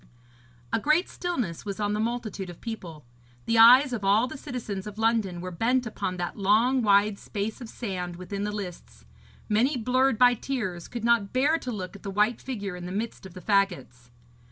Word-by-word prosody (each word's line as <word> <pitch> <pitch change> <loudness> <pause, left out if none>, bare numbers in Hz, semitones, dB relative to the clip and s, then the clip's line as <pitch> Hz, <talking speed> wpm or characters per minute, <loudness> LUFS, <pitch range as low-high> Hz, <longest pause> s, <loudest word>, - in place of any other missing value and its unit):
A - - +3
great 305 - +2
stillness 245 - -3
was 200 0 -5
on 205 0 0
the 210 - -1
multitude 220 -4 -3
of 175 - -10
people. 170 - -7 0.4
The 230 0 +2
eyes 250 +4 +8
of 220 -4 -3
all 205 +4 +4
the 255 - -7
citizens 235 -8 -5
of 210 0 -8
London 220 -6 +1
were 185 0 -5
bent 245 +8 +1
upon 185 -4 -3
that 175 -1 -3
long 225 +7 +3
wide 205 -1 +3
space 215 +4 -4
of 235 - -7
sand 180 -7 -5
within 195 +3 -5
the 210 - -2
lists; 195 -4 -8 0.4
many, 245 +6 +2
blurred 255 +1 +2
by 245 +1 +6
tears, 215 -9 -4
could 235 -2 -6
not 235 -4 +2
bear 290 +6 +3
to 250 - -5
look 190 -4 -6
at 200 - -11
the 200 - -6
white 210 +4 +1
figure 205 -8 -5
in 180 0 -7
the - - -6
midst 210 0 -4
of 185 - -16
the 185 - -8
faggots. 175 - 0
210 Hz, 200 wpm, -27 LUFS, 190-245 Hz, 0.4 s, eyes